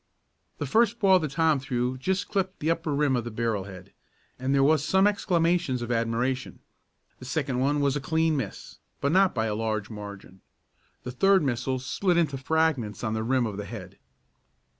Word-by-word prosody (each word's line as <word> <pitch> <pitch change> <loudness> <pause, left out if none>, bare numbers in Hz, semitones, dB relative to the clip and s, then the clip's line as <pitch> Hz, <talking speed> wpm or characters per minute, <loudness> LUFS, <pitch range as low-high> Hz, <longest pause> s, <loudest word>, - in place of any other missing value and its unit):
The - - -3
first 225 - +2
ball 190 -4 +5
that 155 -3 -3
Tom 160 0 +2
threw 125 -2 -2
just 190 +9 -1
clipped 190 -2 -2
the 160 +2 +1
upper 165 -1 -2
rim 140 -2 +2
of 120 - -1
the 120 - -5
barrel 110 -3 -2
head, 95 -1 -12 0.5
and 130 +1 -1
there 135 0 +4
were 155 +2 +4
some 190 +6 +2
exclamations 170 - +1
of 120 - -4
admiration. 120 +3 -1 0.6
The 125 - -10
second 135 -2 -2
one 145 +2 +1
was 140 -1 +1
a 145 - -2
clean 160 +2 +1
miss, 125 -8 -6 0.2
but 140 - 0
not 190 -1 +4
by 110 -1 0
a 110 - -1
large 110 -1 -2
margin. 100 -3 -9 0.6
The 125 - -5
third 195 +7 +3
missile 130 0 -1
split 175 +8 0
into 150 -5 +1
fragments 135 -8 0
on 110 -2 -1
the 110 - -1
rim 125 +2 +1
of 105 -3 -4
the 105 - -5
head. 100 -3 -9
135 Hz, 190 wpm, -26 LUFS, 115-160 Hz, 0.6 s, ball